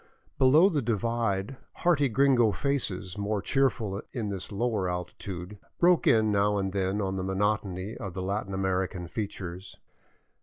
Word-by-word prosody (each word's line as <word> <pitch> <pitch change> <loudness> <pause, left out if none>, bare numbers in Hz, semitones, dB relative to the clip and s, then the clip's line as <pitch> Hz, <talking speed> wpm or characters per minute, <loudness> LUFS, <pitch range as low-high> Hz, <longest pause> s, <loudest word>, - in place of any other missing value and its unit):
Below 145 +8 +6
the 155 -7 0
divide 115 -1 -1 0.2
hearty 145 -6 +2
gringo 125 -2 +4
faces* 105 -9 -2
more 105 +1 -1
cheerful 110 -4 0
in 110 -4 -3
this 100 0 -4
lower 105 -3 0
altitude, 90 +2 -6 0.2
broke 175 -1 +4
in 110 -1 +4
now 105 0 +2
and 95 -1 -2
then 95 +1 0
on 95 -1 -1
the 95 - -2
monotony 95 0 -1
of 95 -4 -7
Latin 100 +2 -2
American 95 -2 -1
features. 95 -2 -6
100 Hz, 140 wpm, -28 LUFS, 95-120 Hz, 0.2 s, Below